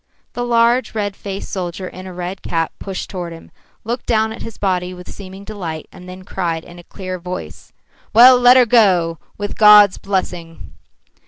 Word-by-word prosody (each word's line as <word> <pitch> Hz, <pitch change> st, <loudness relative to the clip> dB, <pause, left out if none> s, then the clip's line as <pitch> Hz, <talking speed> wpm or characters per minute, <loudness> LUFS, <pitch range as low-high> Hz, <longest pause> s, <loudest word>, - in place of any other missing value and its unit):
The 245 Hz, -, -4 dB
large, 235 Hz, +1 st, +2 dB
red 205 Hz, -2 st, -2 dB
faced 195 Hz, -1 st, -7 dB
soldier 185 Hz, 0 st, -4 dB
in 185 Hz, +1 st, -10 dB
a -, -, -8 dB
red 180 Hz, +1 st, -6 dB
cap 165 Hz, -1 st, -2 dB
pushed 195 Hz, -2 st, -5 dB
toward 175 Hz, -3 st, -6 dB
him, 165 Hz, -, -14 dB, 0.3 s
looked 235 Hz, +2 st, -4 dB
down 220 Hz, -1 st, +1 dB
at -, -, -11 dB
his 225 Hz, -, -8 dB
body 180 Hz, -2 st, -1 dB
with 180 Hz, 0 st, -12 dB
seeming 190 Hz, 0 st, -10 dB
delight, 180 Hz, -7 st, -6 dB
and 180 Hz, 0 st, -13 dB
then 185 Hz, +1 st, -10 dB
cried 170 Hz, -4 st, -3 dB
in 175 Hz, 0 st, -13 dB
a -, -, -13 dB
clear 185 Hz, 0 st, -7 dB
voice: 180 Hz, +1 st, -8 dB, 0.4 s
"Well, 250 Hz, +2 st, +8 dB
let 245 Hz, +1 st, +7 dB
her 250 Hz, -, +6 dB
go, 185 Hz, -8 st, +3 dB, 0.2 s
with 205 Hz, 0 st, -5 dB
God's 210 Hz, -2 st, +7 dB
blessing!" 180 Hz, -4 st, -4 dB
190 Hz, 180 wpm, -18 LUFS, 180-215 Hz, 0.4 s, Well